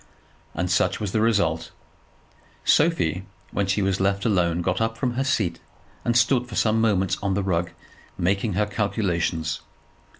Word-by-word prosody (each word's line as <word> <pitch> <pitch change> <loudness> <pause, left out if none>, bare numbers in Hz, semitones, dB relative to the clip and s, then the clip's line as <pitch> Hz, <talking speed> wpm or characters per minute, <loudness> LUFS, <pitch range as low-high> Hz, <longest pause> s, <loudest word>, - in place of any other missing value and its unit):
And 90 +2 -1
such 90 - +2
was 105 -3 -3
the 110 - +1
result. 100 -8 +1 1.0
Sophie, 150 - +2 0.3
when 100 0 -1
she 95 +1 +1
was 95 0 0
left 100 +1 0
alone, 90 -5 +1
got 95 +4 0
up 115 0 0
from 125 +1 0
her 130 +2 0
seat, 105 -11 0 0.4
and 120 0 +2
stood 120 0 +3
for 115 - -7
some 110 +1 +2
moments 95 -5 +2
on 100 -1 0
the 100 - 0
rug, 85 -2 0 0.5
making 100 +4 0
her 105 +3 +1
calculations. 90 -7 -1
100 Hz, 160 wpm, -24 LUFS, 90-115 Hz, 1.0 s, stood